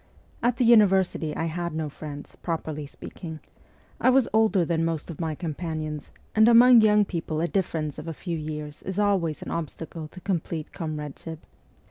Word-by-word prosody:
At 240 0 +2
the 245 - +3
university 190 -8 +4
I 165 - -1
had 170 0 -3
no 160 -1 -1
friends, 145 0 -8
properly 155 -3 -3
speaking; 160 +2 -9 0.6
I - - +4
was 260 -1 +4
older 215 -5 +4
than 165 0 0
most 165 0 -2
of 165 - -7
my 160 -2 -1
companions, 155 -2 -4 0.2
and 220 +1 +6
among 240 0 +8
young 210 -1 +5
people 165 -4 -3
a 170 - +1
difference 160 -6 -2
of 150 - -8
a - - -2
few 170 +1 -4
years 150 -1 -6
is 190 0 -5
always 190 -7 +1
an - - -6
obstacle 160 0 -5
to 180 - -12
complete 170 -4 -3
comrade 150 -3 -5
ship. 160 -1 -8
165 Hz, 175 wpm, -26 LUFS, 155-195 Hz, 0.6 s, among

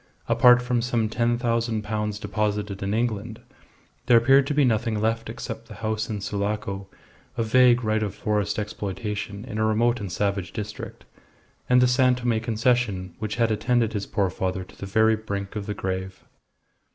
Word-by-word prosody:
Apart 125 0 +6
from 125 -1 0
some 115 -2 0
ten 120 +1 +1
thousand 115 -2 0
pounds 105 -1 -2
deposited 105 -1 -2
in 100 0 -2
England, 110 -1 -2 0.7
there 120 - +7
appeared 135 +4 +5
to 145 - 0
be 145 -2 +4
nothing 110 -2 +1
left 115 +1 -1
except 115 -1 -7
the 110 - -10
house 110 +1 -2
in 105 -2 -3
Sulaco, 100 -1 -3 0.5
a 115 - +1
vague 125 +1 +4
right 110 0 +1
of 105 -3 -3
forest 105 -2 -1
exploitation 105 0 -4
in 110 -4 -5
a - - +2
remote 115 +2 +2
and 100 -4 -5
savage 100 0 -1
district, 105 0 -7 0.6
and 125 0 +5
the 125 - +5
San 125 0 +4
Tome 120 -2 0
Concession, 110 -5 0
which 110 -1 -3
had 115 -1 +2
attended 115 +1 +1
his 100 -2 -3
poor 100 -3 0
father 95 +1 -2
to - - -16
the 100 - -7
very 110 +2 +3
brink 100 -2 -5
of 105 -1 -4
the 105 - -3
grave. 95 0 -4
110 Hz, 175 wpm, -25 LUFS, 105-120 Hz, 0.7 s, there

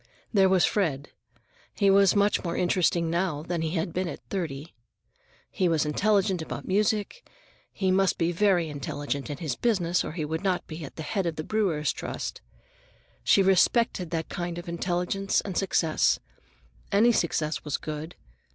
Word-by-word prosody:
There 195 -3 +5
was 185 -2 +4
Fred; 150 -9 -1 0.7
he 200 -2 +4
was 195 -1 +5
much 205 0 +2
more 170 -2 -2
interesting 175 -2 +1
now 170 -4 -1
than 170 0 -2
he 160 +2 -2
had 165 0 -2
been 185 0 -1
at - - -6
thirty. 160 -6 -4 0.8
He 185 -2 +1
was 160 -2 +2
intelligent 195 +3 +1
about 160 - -6
music, 210 - 0
and - - -29 0.4
he 190 -1 0
must 190 0 +2
be 170 0 +1
very 180 -2 +2
intelligent 145 0 -4
in 145 - -4
his 150 -7 -3
business, 180 - +1
or - - -5
he 160 -3 -3
would 160 +4 -3
not 185 -2 0
be 160 0 -8
at 140 - -9
the 160 - -6
head 190 +4 -1
of 165 - -2
the 155 - -4
Brewers' 170 - 0
Trust. - - -5 0.8
She 195 - +5
respected 190 0 +3
that 165 -1 -2
kind 175 -1 -4
of 175 +1 -7
intelligence 180 +3 -1
and 190 -3 -6
success. 170 -4 +2 0.7
Any 215 +4 +5
success 160 -6 0
was 150 -2 -2
good. 155 +2 -6
175 Hz, 170 wpm, -27 LUFS, 160-195 Hz, 0.8 s, There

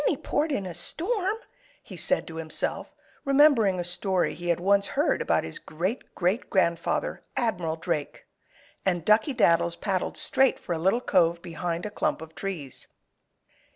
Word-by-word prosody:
"Any - - +1
port 300 +2 -1
in 205 -9 -1
a 180 - -5
storm," 385 - 0 0.5
he - - -10
said 275 - +1
to 160 - -9
himself, 160 -1 -1 0.3
remembering 275 -9 +4
a - - -1
story 180 +1 0
he 175 - -7
had 170 -1 +2
once 200 +2 +3
heard 295 - +2
about - - +1
his - - -7
great 185 +10 -4
great 185 +7 0
grandfather, 170 -4 0 0.2
Admiral 180 -9 0
Drake. 150 -2 -4 0.6
And 175 -4 0
Duckey 220 +6 +3
Daddles 170 -5 +3
paddled 190 -3 -2
straight 265 -1 +2
for 175 - -4
a 165 - -2
little 190 +8 +2
cove 170 -6 +2
behind 170 0 -3
a 210 - -4
clump - - -1
of 160 0 -10
trees. 165 -10 -4
185 Hz, 160 wpm, -27 LUFS, 170-225 Hz, 0.6 s, remembering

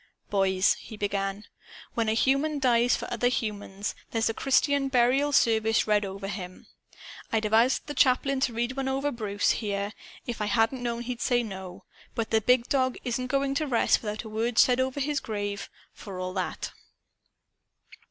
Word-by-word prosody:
"Boys," 190 -1 +3
he 220 - -10
began, 200 0 -2 0.5
"when 225 -2 0
a - - +2
human 275 +5 +2
dies 245 -3 +3
for - - -5
other 240 +1 +1
humans, 205 -4 -3 0.2
there's 225 -1 0
a - - -1
Christian 275 +2 +2
burial 265 +3 +3
service 225 -4 +3
read 210 -1 +2
over 195 0 -5
him. 185 -2 -7 0.7
I'd 225 -1 +1
have 215 0 -2
asked 235 +4 +4
the 290 - -5
chaplain 275 0 +3
to 260 -2 +1
read 240 +2 -1
one 270 -1 -2
over 270 +2 0
Bruce, 205 -4 0
here, 200 -1 -2 0.3
if 235 -3 -4
I 210 - 0
hadn't 225 +4 +1
known 235 -1 -2
he'd 245 0 -5
say 245 -1 +2
no. 190 -4 -8 0.3
But 230 -2 -2
the 220 -1 +3
Big 250 +2 +3
Dog 260 -2 +1
isn't 255 +1 -2
going 275 +1 0
to 300 +2 -1
rest 240 -4 +3
without 210 0 -4
a 220 - -8
word 225 +2 -2
said 250 0 +5
over 260 +2 0
his 285 +1 0
grave, 205 -4 -4 0.2
for 195 -3 -8
all 185 0 -3
that." 185 -1 -3
230 Hz, 180 wpm, -27 LUFS, 205-260 Hz, 0.7 s, said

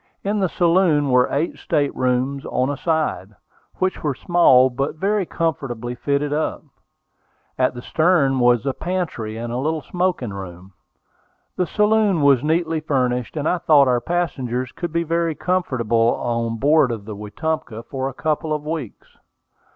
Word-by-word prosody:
In 205 +1 0
the 190 -2 +1
saloon 170 -5 +2
were 125 0 +4
eight 150 +5 -1
state 145 -3 0
rooms 130 +2 0
on 130 +2 0
a 145 - -4
side, 155 - -1 0.4
which 185 0 -1
were 145 -4 -1
small, 130 -8 +4
but 135 +5 -2
very 195 +2 0
comfortably 125 -7 -3
fitted 140 +3 -1
up. 155 +1 -2 0.9
At 130 -1 +1
the 120 - -8
stern 155 -6 +2
was 120 0 +3
a 135 - 0
pantry 160 -12 -3
and 120 +1 -5
a - - -2
little 155 +3 -1
smoking 175 - -2
room. 95 -1 -9 0.8
The 180 - 0
saloon 210 -5 +2
was 140 -3 +4
neatly 160 +1 0
furnished, 125 -3 -1
and 150 +1 -1
I 180 - +1
thought 145 -4 +5
our 125 -1 +2
passengers 130 -7 -2
could 175 -2 -5
be 170 +1 0
very 165 0 -1
comfortable 120 -12 +1
on 115 -1 -2
board 145 +2 +4
of 110 -3 -5
the 105 -1 -7
Wetumpka 115 +2 -4
for 135 +1 -4
a - - -9
couple 155 +1 -1
of 150 -1 -3
weeks. 155 -8 -6
145 Hz, 160 wpm, -21 LUFS, 125-165 Hz, 0.9 s, thought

